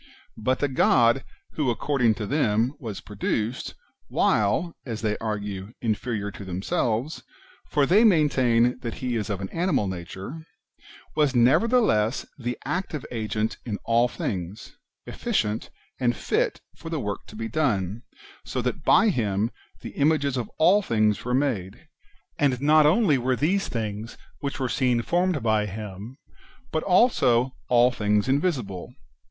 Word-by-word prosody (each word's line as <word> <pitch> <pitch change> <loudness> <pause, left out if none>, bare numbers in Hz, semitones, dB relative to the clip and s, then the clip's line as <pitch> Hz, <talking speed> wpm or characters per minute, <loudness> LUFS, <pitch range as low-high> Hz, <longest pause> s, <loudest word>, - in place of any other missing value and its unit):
But 130 +4 0
the 145 - 0
God 125 -1 +3 0.3
who, 150 -5 -1
according 120 -2 +1
to 110 - -4
them, 120 -1 +1
was 110 -7 -6
produced, 110 +3 -3 0.3
while, 110 - +1
as 115 -3 -6
they 105 -1 +1
argue, 105 -2 -4
inferior 110 -2 -2
to 100 - -9
themselves 110 - -2 0.5
(for 145 -2 +3
they 200 +9 +5
maintain 130 - +3
that 115 -2 -5
he 125 -2 -3
is 110 -2 -2
of 100 -2 -3
an 95 - -4
animal 165 - 0
nature), 95 - -7 0.7
was 145 -4 +2
nevertheless 125 - +3
the 120 0 -3
active 175 -6 -3
agent 110 -1 -2
in 110 -4 -3
all 115 +1 +3
things, 100 -2 -5 0.3
efficient, 105 +1 -2 0.3
and 120 -2 +1
fit - - -1
for 165 - -9
the 160 -2 -2
work 105 -5 -4
to - - -12
be 115 +1 -4
done, 110 - -1 0.4
so - - -4
that - - -2
by 225 - +5
him 110 - 0 0.3
the - - -5
images 145 -2 +1
of 120 -4 -3
all 190 +6 +5
things 110 - +1
were 125 +1 0
made; 115 -10 -2 0.5
and 135 -4 +2
not 150 +2 +5
only 160 - +3
were 130 +1 +1
these 185 +9 +1
things 110 -1 -4 0.2
which 140 0 -4
are 130 - 0
seen 125 -2 +1
formed 175 -4 0
by 110 -2 +2
him, 105 +4 -8 0.5
but 155 - 0
also 135 - +3 0.2
all 125 0 +5
things 105 -2 +1
invisible. 130 - -1
120 Hz, 145 wpm, -25 LUFS, 105-145 Hz, 0.7 s, they